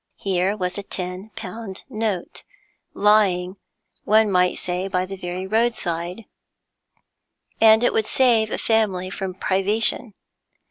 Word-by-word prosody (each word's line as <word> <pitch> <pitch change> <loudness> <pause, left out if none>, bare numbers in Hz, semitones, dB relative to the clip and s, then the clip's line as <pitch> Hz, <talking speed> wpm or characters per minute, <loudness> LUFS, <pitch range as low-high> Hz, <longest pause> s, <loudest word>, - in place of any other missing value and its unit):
Here 195 +1 0
was 180 0 -3
a - - -3
ten 185 +1 -6
pound 195 0 -8
note 215 -5 -3 0.5
lying, 200 -3 +2 0.5
one 215 0 +3
might 180 -1 +2
say, 180 +1 -2
by 185 -1 -1
the 195 +1 -7
very 180 0 -5
roadside, 190 -3 -1 1.4
and 220 +1 +6
it - - +2
would 220 - 0
save 235 -4 +3
a - - -3
family 195 -5 0
from 190 -2 -5
privation. 205 +4 +1
195 Hz, 125 wpm, -22 LUFS, 180-220 Hz, 1.4 s, and